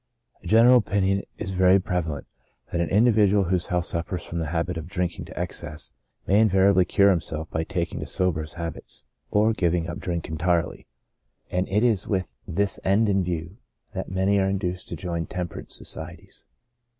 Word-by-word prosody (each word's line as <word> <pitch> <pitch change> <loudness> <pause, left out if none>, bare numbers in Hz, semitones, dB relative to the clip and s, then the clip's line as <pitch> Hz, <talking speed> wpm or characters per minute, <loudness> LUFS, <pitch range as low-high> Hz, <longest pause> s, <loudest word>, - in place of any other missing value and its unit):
' - - -38
A - - -8
general 115 +3 +7
opinion 100 -3 +1 0.2
is 100 -3 -4
very 95 +1 +5
prevalent, 85 -5 -2 0.5
that 85 - 0
an 85 - -1
individual, 105 -2 +4
whose 90 -1 0
health 90 -1 0
suffers 85 +1 -3
from 85 - -4
the 80 - -2
habit 85 +3 -1
of 80 0 -5
drinking 90 0 -3
to - - -9
excess, 75 0 -5 0.3
may 100 +2 +4
invariably 95 -3 +4
cure 100 +2 +4
himself 80 -3 -2
by 80 - -1
taking 85 0 -3
to - - -5
sober 90 -4 0
habits, 85 -2 -7 0.2
or 110 +2 +3
giving 85 -4 0
up 85 +3 -5
drink 85 -4 -3
entirely; 85 +2 -1 0.6
and 90 +1 -1
it 105 +4 +2
is 110 -7 +2
with 95 -4 -1
this 100 +4 +1
end 105 +3 +3
in 95 -1 +2
view 85 +2 -4 0.4
that 95 -2 -4
many 95 +2 +2
are 95 0 +2
induced 95 -2 -2
to - - -5
join 85 -3 -3
temperance 90 -2 -5
societies. 85 +2 -8
90 Hz, 175 wpm, -25 LUFS, 85-100 Hz, 0.6 s, general